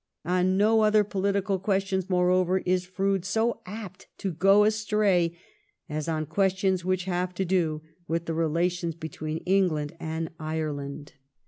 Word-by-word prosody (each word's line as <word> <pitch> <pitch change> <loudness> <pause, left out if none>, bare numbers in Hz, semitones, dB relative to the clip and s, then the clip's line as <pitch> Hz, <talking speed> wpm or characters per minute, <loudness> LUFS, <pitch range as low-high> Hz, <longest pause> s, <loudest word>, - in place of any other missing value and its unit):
On 180 +2 +2
no 220 +2 +4
other 215 0 +4
pohtical 195 -1 -1
questions, 195 -1 0
moreover, 180 0 +3
is 180 0 +1
Froude 195 0 0
so 225 +5 0
apt 195 -2 -8
to 195 - -3
go 195 +5 +5
astray 210 -5 +2 0.5
as 155 0 -4
on 155 -1 -1
questions 190 +2 +1
which 185 0 0
have 180 -1 -2
to 190 - -1
do 165 -4 0 0.2
with 165 +1 -1
the 165 - -2
relations 165 +1 0
between 155 0 -5
England 180 -6 +1
and 160 0 -4
Ireland. 150 -2 -4
180 Hz, 140 wpm, -27 LUFS, 165-195 Hz, 0.5 s, go